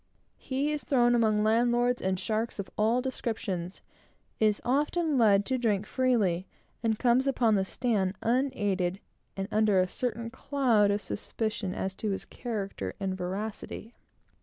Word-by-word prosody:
He 275 +3 -1
is 300 -1 -3
thrown 240 -3 +3
among 215 -3 +3
landlords, 240 +2 +2
and 185 -1 0
sharks 220 +4 -2
of 200 -2 -5
all 230 +4 +2
descriptions; 205 -8 -3 0.6
is 215 -1 +3
often 300 +4 +1
led 205 -5 +4
to 260 -1 -1
drink 210 -4 +1
freely; 215 -10 +1 0.3
and 225 -1 +1
comes 250 +3 +3
upon 240 -4 +3
the 195 -2 +3
stand 200 -2 0
unaided, 205 -7 0 0.4
and 195 0 -2
under 210 -3 +3
a 185 - +3
certain 230 +2 -3
cloud 250 -6 +2
of 205 +1 +1
suspicion 205 -2 -3
as 190 0 -2
to 215 +2 -3
his 195 - -3
character 195 - -5
and 190 -1 -2
veracity. 200 +5 -5
220 Hz, 145 wpm, -29 LUFS, 195-245 Hz, 0.6 s, led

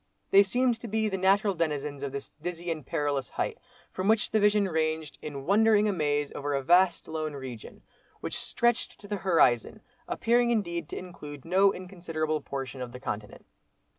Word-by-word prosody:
They 195 - +8
seemed 240 +4 +1
to 235 - -7
be 220 0 0
the 190 - -2
natural 195 +2 +3
denizens 150 -4 -2
of 140 -1 -3
this 140 0 -6
dizzy 175 0 -4
and 155 -2 -4
perilous 140 -1 -1
height, - - -3 0.3
from 185 +1 -3
which 220 0 +3
the 220 - +3
vision 210 -1 +4
ranged, 160 -2 -1
in 140 -2 -6
wondering 215 +2 +4
amaze 145 -6 0
over 145 0 -2
a 135 - -1
vast 175 +3 +4
lone 155 -1 -3
region, 130 -5 -8 0.4
which - - -4
stretched 240 -1 0
to 205 - -11
the 205 0 -2
horizon; 170 - +2 0.3
appearing 235 +1 +2
indeed 170 -8 -1
to - - -5
include 150 -6 -9
no 190 +3 +4
inconsiderable 165 -5 -3
portion 135 -1 -5
of 120 -1 -6
the 125 - -8
continent. 105 -4 -6
170 Hz, 175 wpm, -28 LUFS, 145-200 Hz, 0.4 s, They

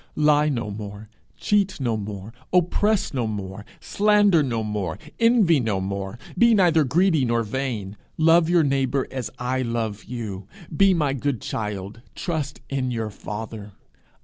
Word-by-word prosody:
Lie 150 0 +3
no 115 -7 -2
more; 105 +1 -8 0.3
cheat 200 -3 +1
no 120 -4 0
more; 105 0 -6 0.2
oppress 185 +3 +2
no 125 -4 -1
more; 100 -1 -5 0.2
slander 205 -4 +3
no 120 -5 -1
more; 105 -6 -3 0.2
envy 230 - +4
no 110 -6 0
more; 95 +2 -4 0.2
be 235 -1 +5
neither 170 -5 +4
greedy 160 +2 +2
nor 120 -1 +1
vain; 110 -4 -3 0.2
love 165 +1 +4
your 175 -2 +4
neighbour 135 -1 +1
as 130 -4 -4
I 130 +1 -1
love 115 -4 -3
you; 105 -5 -6 0.3
be 195 +2 +5
my 150 -5 +1
good 140 -2 -2
child; 105 0 -5
trust 155 -5 -3
in 135 -2 -2
your 115 -3 -3
father. 105 0 -7
125 Hz, 150 wpm, -23 LUFS, 105-160 Hz, 0.3 s, be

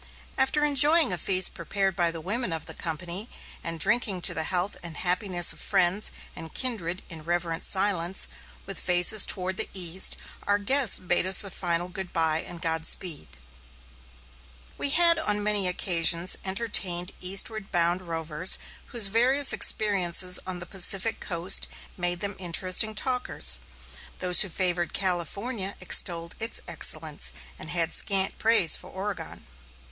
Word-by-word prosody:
After 270 +3 +1
enjoying 295 - +4
a - - 0
feast 185 +2 +3
prepared 195 -2 -3
by 175 -1 +2
the 165 -1 -6
women 205 +4 -3
of 160 -1 -5
the - - -7
company, 175 +6 -6 0.3
and 165 -1 -6
drinking 205 -1 0
to - - +5
the 160 - -2
health 180 +3 -2
and 170 -3 -8
happiness 180 -1 +2
of - - -14
friends 185 +3 +1 0.3
and 160 -1 -9
kindred 190 -9 -5
in 160 -3 -9
reverent 170 0 -3
silence, 190 -2 +2 0.4
with 195 -1 -6
faces 180 +3 +3
toward 185 -1 0
the - - -1
east, 180 0 +1 0.3
our 205 0 +3
guests 245 +3 +4
bade 180 0 -1
us 190 +3 +6
a 200 - -2
final 175 -1 -3
good 185 0 -5
bye 160 -1 0
and 175 -2 -7
godspeed. 160 - -4 1.4
We - - -2
had 335 +2 +5
on 210 -8 +1
many 205 -2 +3
occasions 175 -1 +2
entertained 190 -3 -1
eastward 195 +3 -1
bound 175 +1 +1
rovers 165 0 -1 0.3
whose 235 -4 +2
varied 250 +7 +3
experiences 185 -3 +2
on 185 -1 -4
the 175 - -7
Pacific 195 +3 0
coast 170 0 +1 0.3
made 175 -1 -3
them 200 0 -3
interesting 185 +4 +1
talkers. 245 - +2 0.6
Those 180 -1 +2
who 195 - +1
favored 175 0 -1
California 195 +3 -2
extolled 170 -2 +1
its 225 +1 -2
excellence, - - -2 0.3
and - - -10
had 170 -1 -1
scant 195 -1 +1
praise 225 -7 +3
for - - -11
Oregon. 195 +1 -7
185 Hz, 145 wpm, -25 LUFS, 170-205 Hz, 1.4 s, us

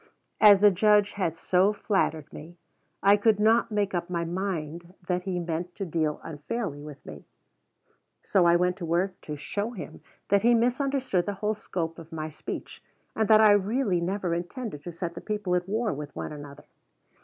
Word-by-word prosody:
As 205 -2 +8
the 205 -1 +7
Judge 205 +2 +3
had 170 -5 -2
so 185 +4 +2
flattered 160 -8 -1
me, 170 +4 -11 0.5
I 200 +1 +7
could 210 0 +3
not 225 +2 +3
make 205 -2 0
up 175 0 -2
my 170 -1 -2
mind 170 -1 -4
that 180 0 -2
he 185 -2 -2
meant 170 +1 -4
to 195 - -4
deal 155 -3 -1
unfairly 160 +1 -5
with 150 -1 -11
me. 75 -2 -10 1.0
So 180 -3 +3
I 170 - +5
went 180 +1 +1
to 180 - -5
work 180 +3 -1
to 150 - -6
show 205 +10 -4
him 190 - -9 0.3
that 200 0 +4
he 240 +1 +5
misunderstood 250 -5 0
the 205 - -2
whole 210 +2 -1
scope 170 -6 -4
of 165 0 -12
my 155 -1 -4
speech, 155 - -7 0.3
and 220 -1 +1
that 215 0 +7
I 215 -1 +7
really 205 -1 +1
never 185 0 -1
intended 175 - -5
to 175 - -5
set 170 0 -5
the 170 - -8
people 210 -4 -2
at 180 +1 0
war 220 +2 0
with 145 0 -8
one - - -5
another. 145 -1 -10
180 Hz, 190 wpm, -27 LUFS, 165-210 Hz, 1.0 s, As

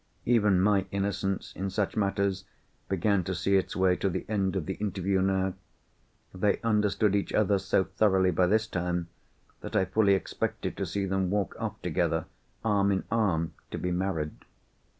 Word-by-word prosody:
Even 105 -6 +4
my 100 0 +3
innocence 100 -1 -2
in 95 +1 -3
such 100 +1 -1
matters 100 -2 0 0.5
began 95 +1 +1
to 95 +2 -3
see 100 +3 +1
its 95 - 0
way 95 -1 +3
to 100 - 0
the - - -3
end 100 -3 0
of 90 -5 -1
the 95 - -2
interview 95 -1 -1
now. 95 0 +1 0.8
They 100 +2 +1
understood 105 -2 +2
each 100 - -1
other 100 -2 +3
so 95 0 +2
thoroughly 95 -1 +2
by 90 +2 +2
this 110 +3 +2
time, 90 -3 -2 0.5
that - - -7
I 95 - +3
fully 100 +1 +3
expected 95 - -3
to - - -2
see 100 -1 -2
them 95 -1 0
walk 100 -1 -1
off - - -4
together, - - 0 0.4
arm 100 -2 +3
in 95 - 0
arm, 95 -8 +1 0.2
to - - -5
be 90 - -2
married. 90 -4 -1
95 Hz, 170 wpm, -28 LUFS, 95-100 Hz, 0.8 s, Even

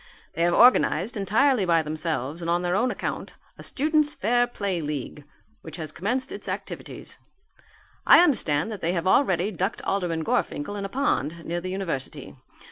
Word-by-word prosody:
They 165 - -4
have 175 0 +3
organized, 235 -4 +4
entirely 220 +4 +2
by 165 -3 +2
themselves 155 -1 -3
and 165 - -3
on 175 +1 +1
their 175 0 0
own 245 +5 +2
account, - - -5 0.2
a - - -8
Students' 300 +1 +1
Fair 245 +4 +2
Play 200 -7 -3
League 145 -1 -5 0.4
which - - -9
has 155 -3 -3
commenced 250 - -2
its - - -5
activities. - - -7 0.9
I - - +9
understand 195 - +1
that 210 - -7
they 170 +2 0
have 170 -1 -2
already 190 -2 +2
ducked 190 +3 -3
Alderman 175 -5 -1
Gorfinkel 155 +4 -1
in 200 -1 -4
a - - -5
pond 170 - -1
near 175 +1 -3
the 185 - -5
university. 185 -8 -5
185 Hz, 170 wpm, -25 LUFS, 165-225 Hz, 0.9 s, I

